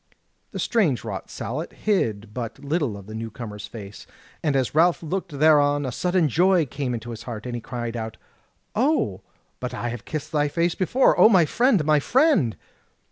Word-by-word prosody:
The -, -, -7 dB
strange 185 Hz, -, +1 dB
wrought 100 Hz, -5 st, -6 dB
sallet 150 Hz, +8 st, -5 dB
hid 110 Hz, -, -1 dB
but 115 Hz, -1 st, -5 dB
little 140 Hz, -8 st, -1 dB
of 100 Hz, -, -11 dB
the 110 Hz, -, -9 dB
new 115 Hz, +1 st, -5 dB
comer's 105 Hz, -2 st, -8 dB
face, 105 Hz, -3 st, -10 dB, 0.3 s
and 150 Hz, -3 st, 0 dB
as 130 Hz, -2 st, 0 dB
Ralph 170 Hz, +3 st, +3 dB
looked 170 Hz, -2 st, -4 dB
thereon 145 Hz, -1 st, +4 dB
a 130 Hz, -, -2 dB
sudden 180 Hz, +4 st, +1 dB
joy 175 Hz, +4 st, +3 dB
came 130 Hz, -1 st, -3 dB
into 120 Hz, +1 st, -6 dB
his 115 Hz, -, -7 dB
heart, 115 Hz, -2 st, -7 dB
and 125 Hz, -, -4 dB
he 120 Hz, -, -4 dB
cried 120 Hz, -1 st, -5 dB
out: 110 Hz, -1 st, -5 dB, 0.6 s
"O, 220 Hz, -, +1 dB, 0.4 s
but -, -, -4 dB
I 120 Hz, -, -3 dB
have 120 Hz, -1 st, -6 dB
kissed 155 Hz, -2 st, -5 dB
thy 150 Hz, -1 st, +2 dB
face 170 Hz, +3 st, 0 dB
before! 245 Hz, +8 st, +3 dB
O, -, -, +8 dB
my 185 Hz, -7 st, +5 dB
friend, 230 Hz, -, +2 dB
my 155 Hz, -1 st, +4 dB
friend!" 250 Hz, -, +2 dB
145 Hz, 190 wpm, -24 LUFS, 115-170 Hz, 0.6 s, O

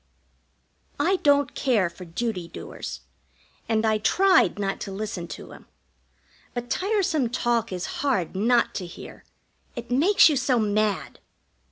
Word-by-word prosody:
I 380 Hz, -, +2 dB
don't 285 Hz, -5 st, +2 dB
care 230 Hz, -9 st, +1 dB
for 170 Hz, +2 st, -10 dB
duty 180 Hz, 0 st, -3 dB
doers, -, -, -8 dB, 0.7 s
and 220 Hz, 0 st, +1 dB
I 215 Hz, -1 st, +2 dB
tried 375 Hz, -, +3 dB
not 195 Hz, -1 st, -2 dB
to 195 Hz, -, -5 dB
listen 200 Hz, -3 st, -5 dB
to -, -, -9 dB
him; -, -, -14 dB, 0.9 s
but 245 Hz, 0 st, -5 dB
tiresome 370 Hz, -, +1 dB
talk 240 Hz, -3 st, 0 dB
is 185 Hz, -1 st, -3 dB, 0.2 s
hard 245 Hz, -, 0 dB
not 235 Hz, +4 st, +2 dB
to 180 Hz, -, -5 dB
hear 170 Hz, -, -11 dB, 0.5 s
it 235 Hz, 0 st, -7 dB
makes 325 Hz, +12 st, +5 dB
you 300 Hz, -3 st, +2 dB
so 255 Hz, -1 st, +1 dB
mad. 210 Hz, -2 st, 0 dB
230 Hz, 140 wpm, -25 LUFS, 200-280 Hz, 0.9 s, makes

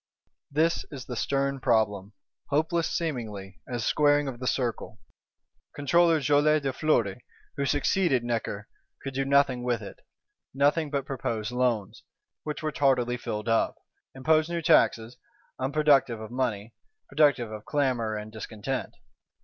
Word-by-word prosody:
This 160 Hz, +4 st, +1 dB
is 135 Hz, -4 st, -8 dB
the 125 Hz, -, -6 dB
stern 140 Hz, +2 st, -1 dB
problem; 105 Hz, -4 st, +1 dB, 0.4 s
hopeless 160 Hz, +3 st, +1 dB
seemingly 110 Hz, -, -4 dB
as 120 Hz, -2 st, -3 dB
squaring 145 Hz, -1 st, +3 dB
of 125 Hz, -3 st, -5 dB
the 125 Hz, -, -4 dB
circle. 120 Hz, -4 st, -2 dB, 0.8 s
Controller 165 Hz, +3 st, +3 dB
Joly 150 Hz, +2 st, +3 dB
de 135 Hz, -2 st, -2 dB
Fleury, 120 Hz, -8 st, 0 dB, 0.3 s
who 140 Hz, -, -1 dB
succeeded 145 Hz, -1 st, +1 dB
Necker, 115 Hz, -3 st, -3 dB, 0.4 s
could 135 Hz, -, -5 dB
do 135 Hz, +1 st, -1 dB
nothing 140 Hz, -2 st, +3 dB
with 120 Hz, -3 st, -1 dB
it; -, -, -10 dB, 0.6 s
nothing 145 Hz, +3 st, +2 dB
but 140 Hz, -2 st, -2 dB
propose 115 Hz, -5 st, -3 dB
loans, 120 Hz, -3 st, -1 dB, 0.4 s
which 150 Hz, +1 st, -5 dB
were 155 Hz, -, -1 dB
tardily 130 Hz, -4 st, +2 dB
filled 105 Hz, -3 st, -5 dB
up; 115 Hz, 0 st, +2 dB, 0.4 s
impose 155 Hz, +4 st, +2 dB
new 170 Hz, -1 st, -3 dB
taxes, 115 Hz, -4 st, +3 dB, 0.4 s
unproductive 135 Hz, -3 st, +2 dB
of 110 Hz, +1 st, -8 dB
money, 120 Hz, -4 st, -2 dB, 0.3 s
productive 140 Hz, -6 st, +2 dB
of 105 Hz, -1 st, -8 dB
clamour 125 Hz, -7 st, 0 dB
and 105 Hz, 0 st, -6 dB
discontent. 110 Hz, +4 st, -5 dB
130 Hz, 135 wpm, -27 LUFS, 115-145 Hz, 0.8 s, squaring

